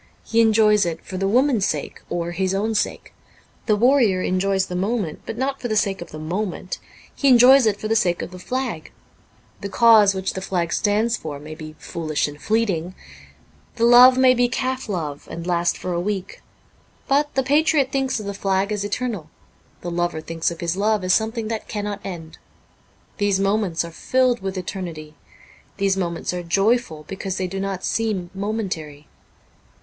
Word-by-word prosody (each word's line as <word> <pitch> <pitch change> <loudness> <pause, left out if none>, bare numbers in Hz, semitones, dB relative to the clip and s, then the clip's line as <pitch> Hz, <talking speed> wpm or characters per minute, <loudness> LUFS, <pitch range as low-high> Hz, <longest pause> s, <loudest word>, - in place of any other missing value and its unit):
He 230 0 +2
enjoys 215 -2 +4
it 165 -2 -4
for 185 - -6
the 195 +1 0
woman's 245 -1 +3
sake, 150 -2 -4
or 170 0 -2
his 190 +2 -1
own 215 +3 0
sake. 210 - -2 0.5
The 215 - +4
warrior 225 -5 +3
enjoys 190 +1 +1
the 180 - -6
moment, 195 -3 -2
but 225 - -5
not 270 +2 -2
for 245 - -2
the 215 - -1
sake 200 -3 0
of 175 - -8
the 155 - -9
moment; 180 +4 -4 0.3
he 280 - 0
enjoys 255 0 +7
it 205 -2 +1
for 215 - -3
the 225 - +1
sake 180 -6 +1
of - - -7
the 185 - -10
flag. 245 -6 -4 0.7
The 200 - -5
cause 215 -2 +6
which 190 0 -2
the 190 - -5
flag 175 -3 -2
stands 220 +3 +1
for 150 -2 -6
may 155 +2 -9
be 155 0 -9
foolish 155 -3 -2
and 145 0 -10
fleeting; 190 -6 0 0.8
the 230 - -2
love 250 +2 +8
may 260 -1 +6
be 245 0 +2
calf 255 -1 -2
love, 155 -7 -4
and 170 - -6
last 175 -1 +1
for 180 - -4
a 170 - -1
week. 195 0 -4 0.7
But 290 +2 +1
the 265 - +2
patriot 290 -1 +2
thinks 270 -3 0
of 210 - -7
the 200 - -4
flag 195 +1 0
as 205 -1 -1
eternal; 205 -5 -3 0.5
the 175 - -5
lover 175 -1 -1
thinks 165 +1 -2
of 170 -1 -8
his 170 0 -1
love 210 0 +1
as 185 0 +2
something 220 +1 0
that 225 -1 -4
cannot 205 -1 -4
end. 165 -4 -8 0.8
These 205 -1 +2
moments 195 -4 0
are 170 - -8
filled 255 +7 +1
with 190 0 -4
eternity; 170 -5 -6 0.6
these 195 -1 +1
moments 175 -2 -2
are 180 - -3
joyful 195 -1 +1
because 190 -1 -4
they 185 - -1
do 195 +2 -4
not 195 -1 -3
seem 205 -6 -1
momentary. 190 -8 -4
195 Hz, 185 wpm, -22 LUFS, 175-225 Hz, 0.8 s, love